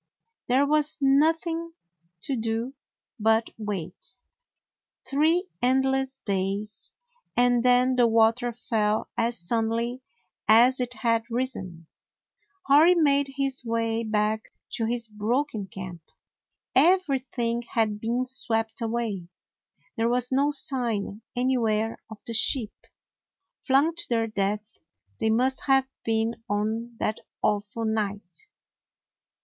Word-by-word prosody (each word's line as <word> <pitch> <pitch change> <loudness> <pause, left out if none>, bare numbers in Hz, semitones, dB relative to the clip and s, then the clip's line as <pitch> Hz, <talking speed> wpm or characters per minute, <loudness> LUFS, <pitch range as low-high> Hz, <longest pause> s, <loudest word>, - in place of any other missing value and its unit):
There 260 +3 +3
was 305 +1 +1
nothing 325 +4 +2 0.5
to 275 - -2
do 230 +2 -2 0.5
but 220 +1 +2
wait 200 +2 -6 0.4
— - - -34
three 325 +6 +2
endless 265 +1 +1
days 200 +2 -2 0.2
— 485 +1 -39
and 245 0 +4
then 250 +1 +3
the 240 -1 +5
water 230 +2 +3
fell 220 -2 -1
as 230 +1 0
sud 225 +6 0
denly 235 +3 -2 0.5
as 240 +4 +6
it 250 -1 -3
had 230 0 0
risen. 230 -9 -3 0.8
Hori 315 +5 +6
made 285 -4 +3
his 275 -2 -1
way 230 -1 -1
back 215 0 -1 0.2
to 225 - -1
his 235 0 -2
broken 220 +1 -2
camp. 185 -2 -8 0.7
Everything 265 -7 +2
had 220 -3 -1
been 240 +3 -1
swept 225 -3 -1
away. 225 -6 -2 0.7
There 225 +1 +1
was 245 +1 0
no 275 +2 +3
sign 240 -7 0
any 255 +1 +1
where 220 0 0
of 220 - -9
the 230 - -3
sheep. 225 0 +2 0.9
Flung 280 +5 +4
to 340 +1 -4
their 230 -2 +1
death 210 0 -3 0.4
they 220 - +1
must 255 +4 +1
have 270 -1 +3 0.2
been 225 +1 -1
on 220 +3 -2
that 215 - -2 0.2
awful 210 +2 -1
night. 210 - -3
235 Hz, 120 wpm, -26 LUFS, 220-265 Hz, 0.9 s, as